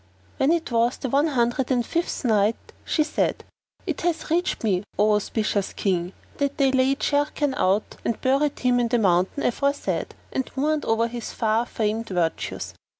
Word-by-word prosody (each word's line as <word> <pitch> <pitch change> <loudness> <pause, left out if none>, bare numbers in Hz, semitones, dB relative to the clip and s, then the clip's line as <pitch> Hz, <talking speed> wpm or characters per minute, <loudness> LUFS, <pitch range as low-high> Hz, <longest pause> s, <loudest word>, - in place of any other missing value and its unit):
When 270 +3 +3
it 330 -5 0
was 235 +1 +2
the 265 - -4
One 285 +5 +3
Hundred 250 -2 0
and 245 -3 +1
Fifth 335 -2 -2
Night, 215 -1 +3 0.3
She 310 - +1
said, 300 - -1 0.4
It 335 -7 -3
hath 330 -2 -1
reached 350 -4 0
me, 190 -5 +2 0.2
O 210 +1 +4
auspicious 210 -1 -1
King, 180 -2 -1 0.2
that 280 0 -1
they 270 -2 +3
laid 265 +1 +2
Sharrkan 290 -1 +1
out 195 0 0
and 230 - -1
buried 275 +2 +1
him 250 -1 +3
in 240 - +2
the 240 +1 +2
mountain 190 +4 +2
aforesaid 280 +4 -1 0.2
and 265 - -2
mourned 300 +3 0
over 225 +1 +2
his 235 -1 -6
far 225 +1 +1
famed 220 +1 -2
virtues. 175 -3 -2
245 Hz, 170 wpm, -24 LUFS, 215-285 Hz, 0.4 s, O